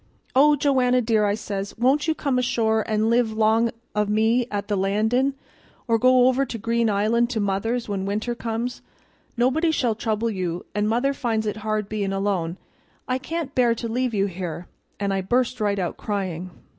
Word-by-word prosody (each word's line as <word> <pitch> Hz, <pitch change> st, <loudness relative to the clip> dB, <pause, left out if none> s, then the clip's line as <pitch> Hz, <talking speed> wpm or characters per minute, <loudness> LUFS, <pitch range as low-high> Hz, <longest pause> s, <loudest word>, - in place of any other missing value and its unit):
'Oh, 295 Hz, +3 st, +6 dB
Joanna 260 Hz, -3 st, +2 dB
dear,' 220 Hz, -3 st, +2 dB
I 200 Hz, -, +1 dB
says, 200 Hz, -2 st, -5 dB
'won't 270 Hz, +6 st, +2 dB
you 320 Hz, -, +1 dB
come 275 Hz, -5 st, 0 dB
ashore 220 Hz, -3 st, +1 dB
an' 215 Hz, +1 st, +1 dB
live 235 Hz, -2 st, +2 dB
'long 220 Hz, +1 st, +3 dB, 0.3 s
o' 210 Hz, -, +3 dB
me 220 Hz, +4 st, +2 dB
at 205 Hz, -1 st, -3 dB
the 210 Hz, -, 0 dB
Landin', 220 Hz, +8 st, +1 dB, 0.5 s
or 230 Hz, -1 st, +2 dB
go 255 Hz, +1 st, +5 dB
over 260 Hz, +1 st, +3 dB
to 245 Hz, -, -5 dB
Green 230 Hz, +1 st, 0 dB
Island 220 Hz, +4 st, +2 dB
to 235 Hz, -, -2 dB
mother's 210 Hz, +4 st, -1 dB
when 195 Hz, -2 st, -3 dB
winter 215 Hz, +4 st, -1 dB
comes? 235 Hz, +1 st, -4 dB, 0.6 s
Nobody 265 Hz, +8 st, +2 dB
shall 255 Hz, -7 st, +1 dB
trouble 225 Hz, +1 st, -1 dB
you 180 Hz, -3 st, -3 dB
an' 210 Hz, 0 st, 0 dB
mother 245 Hz, +5 st, +1 dB
finds 225 Hz, -5 st, -1 dB
it 210 Hz, 0 st, -2 dB
hard 215 Hz, -1 st, -2 dB
bein' 205 Hz, -2 st, -2 dB
alone. 190 Hz, -4 st, -1 dB, 0.5 s
I 255 Hz, 0 st, 0 dB
can't 320 Hz, 0 st, -4 dB
bear 240 Hz, -2 st, +3 dB
to 230 Hz, +1 st, -4 dB
leave 245 Hz, 0 st, -1 dB
you 195 Hz, -1 st, +2 dB
here' 180 Hz, -2 st, -5 dB, 0.3 s
and 200 Hz, -1 st, 0 dB
I 195 Hz, -, 0 dB
burst 245 Hz, +4 st, 0 dB
right 205 Hz, -1 st, +1 dB
out 180 Hz, -3 st, -2 dB
crying. 185 Hz, -4 st, -3 dB
220 Hz, 185 wpm, -23 LUFS, 205-250 Hz, 0.6 s, Oh